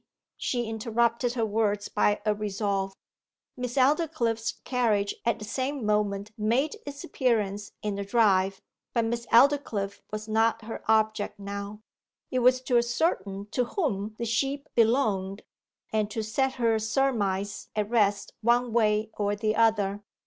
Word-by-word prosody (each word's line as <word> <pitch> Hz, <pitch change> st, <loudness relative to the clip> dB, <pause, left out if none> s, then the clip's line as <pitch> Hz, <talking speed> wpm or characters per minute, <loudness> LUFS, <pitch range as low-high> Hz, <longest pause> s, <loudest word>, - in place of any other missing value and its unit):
She 240 Hz, -2 st, -1 dB
interrupted 235 Hz, +2 st, 0 dB
her 230 Hz, -3 st, 0 dB
words 210 Hz, -1 st, 0 dB
by 205 Hz, 0 st, +1 dB
a 215 Hz, -, +3 dB
resolve. 200 Hz, -2 st, -2 dB, 0.6 s
Miss 250 Hz, -1 st, -4 dB
Aldclyffe's 265 Hz, -5 st, +1 dB
carriage 220 Hz, -6 st, +1 dB
at 235 Hz, -, +2 dB
the 215 Hz, -, -7 dB
same 260 Hz, +2 st, -2 dB
moment 210 Hz, -1 st, 0 dB
made 255 Hz, -, +1 dB
its 285 Hz, 0 st, -6 dB
appearance 210 Hz, -7 st, -1 dB
in 210 Hz, -1 st, -1 dB
the 200 Hz, 0 st, -3 dB
drive; 195 Hz, -3 st, +2 dB, 0.3 s
but 230 Hz, -1 st, +2 dB
Miss 235 Hz, +1 st, -3 dB
Aldclyffe 235 Hz, -6 st, +3 dB
was 215 Hz, +1 st, -5 dB
not 225 Hz, +1 st, +2 dB
her 225 Hz, -, -7 dB
object 215 Hz, -1 st, +1 dB
now. 200 Hz, +1 st, -6 dB, 0.5 s
It 255 Hz, -, +1 dB
was 255 Hz, +1 st, +4 dB
to 250 Hz, -2 st, +3 dB
ascertain 205 Hz, -, -1 dB
to 250 Hz, -, +1 dB
whom 215 Hz, -, -2 dB
the 235 Hz, -, -3 dB
sheep 275 Hz, +6 st, -1 dB
belonged, 220 Hz, -5 st, +1 dB, 0.5 s
and 215 Hz, -1 st, +1 dB
to 220 Hz, +1 st, -3 dB
set 265 Hz, +5 st, 0 dB
her 230 Hz, -3 st, +1 dB
surmise 215 Hz, -5 st, -1 dB
at 210 Hz, -1 st, 0 dB
rest 205 Hz, -3 st, +2 dB
one 240 Hz, +1 st, +2 dB
way 215 Hz, -1 st, +2 dB
or 205 Hz, 0 st, +1 dB
the 215 Hz, +1 st, 0 dB
other. 210 Hz, -3 st, +2 dB
220 Hz, 145 wpm, -27 LUFS, 205-240 Hz, 0.6 s, was